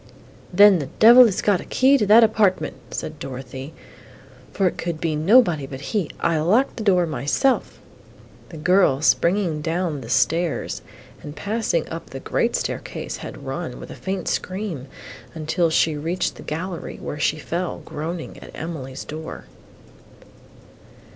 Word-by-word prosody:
"Then 200 Hz, 0 st, +7 dB
the 140 Hz, -, -4 dB
devil 240 Hz, +3 st, +9 dB
has 200 Hz, -, -2 dB
got 200 Hz, -3 st, +2 dB
a -, -, -8 dB
key 265 Hz, +2 st, +3 dB
to 210 Hz, -, +1 dB
that 220 Hz, +3 st, +8 dB
apartment," 215 Hz, -4 st, +2 dB, 0.2 s
said 155 Hz, -1 st, -6 dB
Dorothée, 130 Hz, +1 st, -7 dB, 0.8 s
"for 195 Hz, -, 0 dB
it -, -, -1 dB
could 170 Hz, -2 st, -4 dB
be 160 Hz, -2 st, -1 dB
nobody 165 Hz, -, +4 dB
but 135 Hz, +1 st, -7 dB
he; 205 Hz, -6 st, 0 dB
I 165 Hz, -2 st, +1 dB
locked 210 Hz, -, +2 dB
the 220 Hz, -, -4 dB
door 180 Hz, -4 st, +3 dB
myself!" 160 Hz, -, 0 dB, 0.7 s
The 165 Hz, -, -9 dB
girl, 155 Hz, -4 st, +3 dB
springing 170 Hz, -2 st, +2 dB
down 165 Hz, -2 st, -2 dB
the 115 Hz, -, -9 dB
stairs 165 Hz, +5 st, 0 dB, 0.4 s
and 145 Hz, 0 st, -9 dB
passing 225 Hz, -, -1 dB
up -, -, -7 dB
the -, -, -7 dB
great -, -, 0 dB
staircase, -, -, -4 dB
had -, -, -9 dB
run, -, -, -5 dB
with -, -, -9 dB
a -, -, -8 dB
faint 190 Hz, -2 st, -4 dB
scream, 185 Hz, -8 st, -3 dB, 0.6 s
till 170 Hz, +2 st, +1 dB
she 160 Hz, -1 st, +2 dB
reached 170 Hz, +5 st, -2 dB
the -, -, -12 dB
gallery, 170 Hz, +3 st, -5 dB
where 150 Hz, -, -6 dB
she 155 Hz, -, +1 dB
fell, 170 Hz, +3 st, -4 dB
groaning, 160 Hz, +2 st, -6 dB
at -, -, -12 dB
Emily's 135 Hz, -5 st, -6 dB
door. 160 Hz, +1 st, -7 dB
170 Hz, 155 wpm, -22 LUFS, 150-200 Hz, 0.8 s, devil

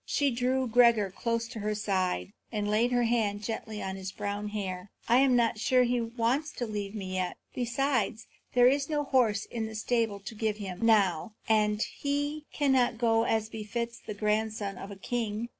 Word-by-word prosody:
She 285 Hz, -2 st, +1 dB
drew 255 Hz, +2 st, 0 dB
Gregor 230 Hz, -4 st, +4 dB
close 230 Hz, 0 st, -1 dB
to 235 Hz, -2 st, -7 dB
her 210 Hz, 0 st, -1 dB
side, 195 Hz, -2 st, -1 dB, 0.2 s
and 210 Hz, -2 st, -1 dB
laid 220 Hz, +4 st, +2 dB
her 245 Hz, -1 st, +3 dB
hand 215 Hz, -3 st, 0 dB
gently 220 Hz, -1 st, -4 dB
on 190 Hz, 0 st, -4 dB
his 190 Hz, 0 st, -5 dB
brown 205 Hz, +1 st, -3 dB
hair. 190 Hz, -2 st, -4 dB, 0.2 s
"I 240 Hz, -, +5 dB
am 265 Hz, -1 st, +5 dB
not 235 Hz, -2 st, +2 dB
sure 255 Hz, +3 st, +3 dB
that 245 Hz, -, +2 dB
he 245 Hz, -1 st, +1 dB
wants 240 Hz, +6 st, 0 dB
to 245 Hz, -, -3 dB
leave 210 Hz, -1 st, -4 dB
me 190 Hz, -3 st, -5 dB
yet. 185 Hz, -1 st, -2 dB, 0.2 s
Besides, 240 Hz, -3 st, 0 dB, 0.3 s
there 245 Hz, 0 st, +6 dB
is 275 Hz, +2 st, +2 dB
no 295 Hz, -1 st, 0 dB
horse 235 Hz, -7 st, +2 dB
in 225 Hz, -2 st, -4 dB
the 220 Hz, -, -8 dB
stable 220 Hz, -2 st, 0 dB
to 200 Hz, +4 st, -8 dB
give 215 Hz, -1 st, -1 dB
him, 195 Hz, -1 st, -6 dB
now, 210 Hz, -3 st, +3 dB
and 210 Hz, -1 st, +3 dB
he 290 Hz, +1 st, -3 dB
cannot 265 Hz, -5 st, +2 dB
go 225 Hz, -1 st, +3 dB
as 220 Hz, -1 st, +1 dB
befits 235 Hz, +2 st, -4 dB
the 210 Hz, -, -7 dB
grandson 210 Hz, -1 st, -1 dB
of 195 Hz, -, -7 dB
a 200 Hz, -, -7 dB
king." 225 Hz, +2 st, -3 dB
225 Hz, 190 wpm, -29 LUFS, 210-245 Hz, 0.3 s, there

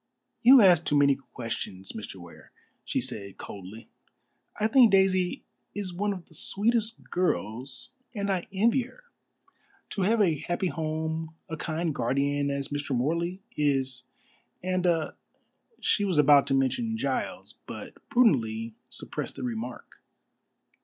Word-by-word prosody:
"You 255 Hz, +2 st, +9 dB
ask 175 Hz, -4 st, +6 dB
too 145 Hz, -, +2 dB
many 140 Hz, -1 st, +5 dB
questions, 115 Hz, -7 st, -6 dB
Mr. 105 Hz, -3 st, -7 dB
Ware," 85 Hz, -2 st, -13 dB, 0.3 s
she -, -, -1 dB
said 100 Hz, -2 st, -5 dB
coldly. 100 Hz, +3 st, -9 dB, 0.7 s
"I 210 Hz, -, +2 dB
think 230 Hz, 0 st, +6 dB
Daisy 185 Hz, -2 st, +3 dB, 0.3 s
is 200 Hz, -3 st, -4 dB
one 205 Hz, +4 st, 0 dB
of 185 Hz, -4 st, -6 dB
the -, -, -21 dB
sweetest 220 Hz, +7 st, 0 dB
of -, -, -23 dB
girls, 130 Hz, -, -2 dB, 0.3 s
and 200 Hz, -1 st, -1 dB
I 185 Hz, -3 st, -1 dB
envy 230 Hz, +7 st, +3 dB
her. 255 Hz, -, -12 dB, 0.9 s
To 200 Hz, -, -1 dB
have 220 Hz, +5 st, +3 dB
a 165 Hz, -8 st, +3 dB
happy 175 Hz, +3 st, -1 dB
home, 160 Hz, 0 st, -3 dB
a 160 Hz, -, -4 dB
kind 160 Hz, 0 st, -2 dB
guardian 140 Hz, +3 st, 0 dB
as 140 Hz, 0 st, -3 dB
Mr. 145 Hz, -2 st, -2 dB
Morley 170 Hz, +9 st, -1 dB
is, 135 Hz, -4 st, 0 dB, 0.6 s
and 185 Hz, 0 st, 0 dB
a 165 Hz, -3 st, +1 dB, 0.3 s
" 460 Hz, -, -38 dB
She 205 Hz, -, +2 dB
was 190 Hz, -5 st, 0 dB
about 145 Hz, -1 st, +6 dB
to 135 Hz, -, +2 dB
mention 225 Hz, -, 0 dB
Giles, -, -, -3 dB
but -, -, -7 dB, 0.2 s
prudently 115 Hz, -, +2 dB, 0.2 s
suppressed -, -, -5 dB
the 135 Hz, -, -6 dB
remark. 120 Hz, 0 st, -6 dB
160 Hz, 145 wpm, -28 LUFS, 135-195 Hz, 0.9 s, You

